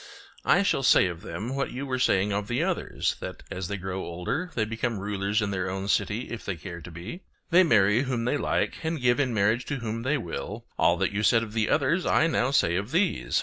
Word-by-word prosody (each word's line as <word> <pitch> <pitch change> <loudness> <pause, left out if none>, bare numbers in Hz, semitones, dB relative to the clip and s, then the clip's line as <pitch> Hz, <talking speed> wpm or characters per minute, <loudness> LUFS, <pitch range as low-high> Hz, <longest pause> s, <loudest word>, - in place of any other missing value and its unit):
I - - +4
shall 165 - +1
say 130 - +5
of 85 -2 -4
them, 120 +8 -5
what 135 - -1
you 135 +3 -5
were 130 -2 -2
saying 100 -4 +2
of 100 0 -2
the 120 +7 0
others, 185 -1 -1
that - - -7
as 90 -1 -4
they 100 - -3
grow 95 0 -4
older, 90 - -3
they 110 - +1
become 110 +1 -2
rulers 100 +1 -1
in 100 - -1
their 95 -1 -2
own 95 +1 -4
city 110 +4 0
if 115 - -5
they 95 - -3
care 85 +2 -8
to 85 - -9
be; 90 - -8 0.3
they 175 +2 +7
marry 110 - +4
whom 125 -4 -2
they 125 - +1
like - - 0
and 160 -1 -2
give 125 +1 +2
in 130 -3 +1
marriage 110 +3 +1
to 145 - -3
whom 115 -3 -4
they 135 +5 +1
will; 85 -10 -6
all - - +3
that - - 0
you 100 +1 -1
said 115 +1 +4
of 110 -2 -8
the 110 -1 0
others 160 +5 +2
I - - +4
now 130 -6 +1
say 85 -11 +2
of 100 +4 -3
these. 185 - +1
115 Hz, 240 wpm, -27 LUFS, 100-135 Hz, 0.3 s, they